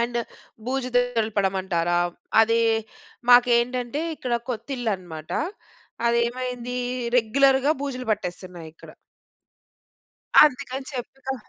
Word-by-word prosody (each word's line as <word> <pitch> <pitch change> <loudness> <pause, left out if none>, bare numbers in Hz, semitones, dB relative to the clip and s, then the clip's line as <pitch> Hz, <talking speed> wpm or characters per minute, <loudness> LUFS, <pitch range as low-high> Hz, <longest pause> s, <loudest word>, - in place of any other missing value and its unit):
And 235 0 -1 0.5
బూజు 260 0 -1
దులపడమంటారా! 195 -7 0 0.4
అది 230 +1 +3 0.7
మాకేంటంటే 245 +2 +4
ఇక్కడ 250 -4 -5 0.2
కొత్తిల్లు 245 -1 -3
అన్నమాట 160 -4 -10 0.8
అది 235 0 +2
ఏమైంది 250 0 -5 0.4
రెగ్యులర్‌గా 270 +4 +3
బూజులు 255 -3 -4
పట్టేస్తున్నాయి 180 -4 -4
ఇక్కడ. 160 - -14 1.5
అందుకని 265 -2 -1
చెప్పి‌నా 265 +1 -5
245 Hz, 85 wpm, -24 LUFS, 210-255 Hz, 1.5 s, మాకేంటంటే